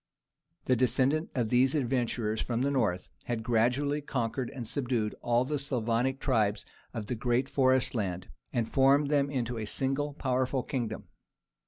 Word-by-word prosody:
The 130 - +3
descendants 130 +5 +2
of 120 -4 0
these 130 +3 +4
adventurers 120 -5 0
from 120 +1 -1
the 140 - +1
north 105 -10 0 0.2
had 115 -2 -2
gradually 125 +6 +1
conquered 125 -2 -2
and 125 -5 -6
subdued 120 -6 -1
all 120 +1 +2
the 150 +1 -2
Slavonic 125 -1 0
tribes 110 -7 +1 0.3
of 115 -4 -5
the 125 - -3
great 120 +3 0
forest 130 -2 +2
land, 95 -6 -3 0.2
and 120 -3 0
formed 140 +3 +3
them 140 -1 +2
into 125 -4 -2
a 110 - -3
single 135 +6 -1
powerful 130 -1 0
kingdom. 115 -5 -3
125 Hz, 155 wpm, -30 LUFS, 115-135 Hz, 0.3 s, these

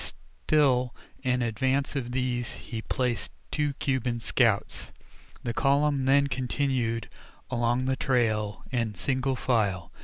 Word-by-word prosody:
Still 130 -5 +3 0.3
in 125 -2 +1
advance 130 +5 0
of 125 -3 -2
these 125 -1 -1
he 115 -2 -6
placed 120 -2 -1 0.2
two 150 -2 0
Cuban 130 -3 -1
scouts. - - +1 0.5
The 120 - -2
column 140 +1 +2
then 140 +1 +5
continued 125 -3 -1 0.4
along 120 +1 +1
the 130 0 +1
trail 110 -5 +1
in 115 -5 -1
single 130 +8 0
file. 100 -9 0
125 Hz, 120 wpm, -28 LUFS, 115-135 Hz, 0.5 s, then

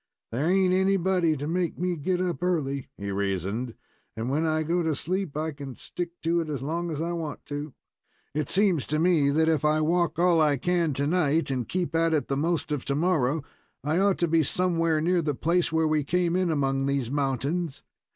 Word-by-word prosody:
"There 135 +8 0
ain't 185 0 +3
anybody 185 -3 +2
to 145 +2 -4
make 175 0 -1
me 180 +1 -1
get 180 +4 -1
up 180 -2 -2
early," 145 -7 -1
he 100 0 -4
reasoned, 100 +4 -2 0.4
"and 115 +3 -2
when 155 +3 +1
I 155 0 +1
go 170 +3 0
to 160 -3 0
sleep 180 -1 -3
I 160 +1 -1
can 140 -3 -8
stick 175 -1 -5
to 170 +1 +2
it 160 - -5
as 140 -4 -3
long 170 +4 -2
as 155 -3 -4
I 165 +2 -2
want 165 -3 -5
to. 145 -1 -5 0.6
It 150 -2 -2
seems 190 - +2
to 155 - 0
me 160 -4 +3
that 160 +3 +2
if 160 -3 +2
I 150 0 +3
walk 165 0 +1
all 170 -1 +4
I 150 -2 +3
can 170 +1 +1
tonight, 150 +1 +1
and 125 -4 -2
keep 180 -4 -2
at 165 0 +3
it 150 - -1
the 135 - +1
most 160 +2 -1
of 145 -3 -1
tomorrow, 150 -1 +1 0.4
I 155 +5 +1
ought 200 -1 +3
to 170 - +1
be 165 0 +3
somewhere 165 0 +1
near 175 +2 +2
the 150 -3 -1
place 170 +5 +1
where 160 0 +2
we 155 -1 +1
came 175 +3 +1
in 185 -1 +1
among 135 -3 0
these 140 -3 -1
mountains. 145 +3 -1
160 Hz, 210 wpm, -26 LUFS, 140-175 Hz, 0.6 s, all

